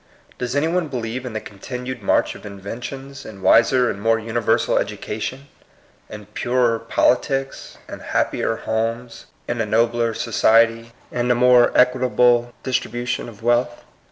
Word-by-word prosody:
Does 125 +1 -3
any 145 +3 +2
one 175 0 0
believe 125 -1 -4
in 120 - -7
the 110 - -2
continued 125 +5 -7
march 95 - +1
of - - -13
inventions, 120 +7 -8
in 100 -3 -11
wiser 125 +2 +4
and 100 - -4
more 115 +1 +3
universal 115 0 0
education, 130 +6 -5 0.6
in 105 -1 -9
purer 120 +2 0
politics, 135 +4 0
in - - -8
happier 115 - -1
homes, 115 +2 -3 0.2
in 120 -1 -2
a - - 0
nobler 115 +1 +1
society, 115 0 +2 0.2
in 125 0 -1
a 125 - +4
more 125 0 +5
equitable 125 -1 +3
distribution 120 -2 -2
of 110 -1 -15
wealth? 120 0 +1
120 Hz, 140 wpm, -21 LUFS, 115-125 Hz, 0.6 s, more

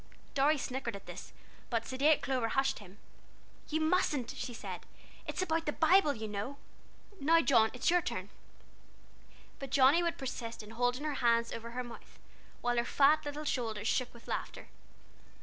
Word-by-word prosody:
Dorry 290 +3 +3
snickered 255 -4 -3
at 200 - -10
this, - - -9 0.4
but 230 -2 -1
sedate 280 +4 +3
Clover 255 -4 0
hushed 270 +3 +1
him. 200 -1 -14 0.7
"You 315 - 0
mustn't," 315 -6 +1
she 250 - -5
said; 235 - -7 0.4
"it's - - -1
about 325 -2 -1
the - - +2
Bible, 320 -1 +4
you 220 -1 -5
know. 210 +7 -4 0.6
Now 325 +4 +5
John, 230 -8 +4
it's 250 +6 +1
your 355 0 +4
turn." 185 - -4 1.3
But 275 - -6
Johnnie 275 +5 +5
would 340 -1 -1
persist 235 -4 -5
in 210 - -11
holding 245 +4 0
her 305 -1 -1
hands 235 -1 +3
over 230 +1 -6
her 250 +2 -4
mouth, 240 -1 -12 0.4
while 245 0 0
her 235 - +3
fat 295 +5 +4
little 295 +1 -5
shoulders 225 -6 -2
shook 250 +1 +1
with 235 - -16
laughter. - - -5
260 Hz, 165 wpm, -32 LUFS, 230-300 Hz, 1.3 s, Now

